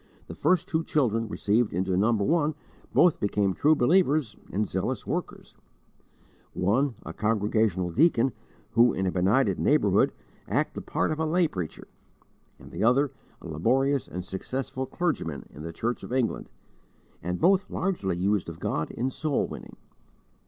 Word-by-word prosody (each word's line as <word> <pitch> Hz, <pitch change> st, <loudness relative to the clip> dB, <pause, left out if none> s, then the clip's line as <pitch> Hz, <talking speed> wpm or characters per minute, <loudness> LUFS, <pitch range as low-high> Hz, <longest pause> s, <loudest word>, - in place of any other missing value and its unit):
The -, -, -8 dB
first 185 Hz, -1 st, +1 dB
two 160 Hz, -2 st, 0 dB
children 115 Hz, -8 st, +1 dB
received 105 Hz, +2 st, +1 dB
into 95 Hz, +1 st, 0 dB
No. 105 Hz, +5 st, +3 dB
1 150 Hz, +8 st, +1 dB, 0.4 s
both 175 Hz, -3 st, +4 dB
became 100 Hz, -1 st, +1 dB
true 150 Hz, -, +3 dB
believers 145 Hz, -, +2 dB, 0.2 s
and 105 Hz, +3 st, 0 dB
zealous -, -, -2 dB
workers: -, -, -5 dB, 1.0 s
one, 115 Hz, +8 st, +1 dB
a -, -, -6 dB
Congregational 105 Hz, -4 st, 0 dB
deacon, 135 Hz, -, +3 dB, 0.4 s
who, 120 Hz, +1 st, +5 dB
in 95 Hz, -, -1 dB
a 90 Hz, -, +1 dB
benighted 100 Hz, +3 st, +2 dB
neighbourhood, -, -, +3 dB, 0.4 s
acted -, -, 0 dB
the -, -, -9 dB
part -, -, +1 dB
of 155 Hz, -, -3 dB
a 160 Hz, -, +1 dB
lay 170 Hz, +2 st, +3 dB
preacher; 90 Hz, -, -6 dB, 0.7 s
and -, -, -14 dB
the -, -, -3 dB
other, 130 Hz, +5 st, +3 dB, 0.3 s
a -, -, -7 dB
laborious 135 Hz, -, +1 dB
and 90 Hz, 0 st, -6 dB
successful 130 Hz, +7 st, -4 dB
clergyman 125 Hz, -, -2 dB
in 75 Hz, -, -10 dB
the 85 Hz, +1 st, -5 dB
Church 120 Hz, +8 st, -3 dB
of -, -, -9 dB
England, 125 Hz, -3 st, -1 dB, 0.7 s
and 90 Hz, +1 st, -3 dB
both 190 Hz, +2 st, +3 dB
largely 100 Hz, -, -1 dB
used 100 Hz, 0 st, 0 dB
of 80 Hz, -, -9 dB
God 80 Hz, -, -2 dB
in 130 Hz, +3 st, -2 dB
soul 150 Hz, +1 st, -1 dB
winning. -, -, -9 dB
115 Hz, 155 wpm, -27 LUFS, 95-145 Hz, 1.0 s, who